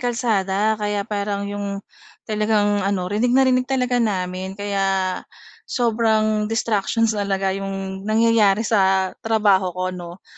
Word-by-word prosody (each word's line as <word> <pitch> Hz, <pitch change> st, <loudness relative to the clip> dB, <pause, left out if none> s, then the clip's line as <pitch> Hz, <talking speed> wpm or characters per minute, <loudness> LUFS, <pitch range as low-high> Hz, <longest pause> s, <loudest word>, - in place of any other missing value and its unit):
kalsada, 220 Hz, -3 st, 0 dB
kaya 205 Hz, -1 st, -1 dB
parang 200 Hz, -1 st, -3 dB
‘yong 200 Hz, -1 st, -5 dB, 0.4 s
talagang 210 Hz, -1 st, +1 dB
ano, 195 Hz, -1 st, -1 dB
rinig 210 Hz, +6 st, 0 dB
na 265 Hz, -, +5 dB
rinig 255 Hz, 0 st, +2 dB
talaga 250 Hz, -2 st, +1 dB
namin, 190 Hz, -3 st, -2 dB
kaya 200 Hz, -1 st, -1 dB, 0.8 s
sobrang 220 Hz, -2 st, +1 dB
distractions 225 Hz, 0 st, 0 dB
talaga 195 Hz, -2 st, -1 dB
‘yong 195 Hz, 0 st, -5 dB
nangyayari 220 Hz, -2 st, +3 dB
sa 190 Hz, -3 st, +2 dB
trabaho 210 Hz, -4 st, +2 dB
ko, 185 Hz, 0 st, -2 dB
‘no? 175 Hz, 0 st, -9 dB
205 Hz, 120 wpm, -21 LUFS, 195-220 Hz, 0.8 s, na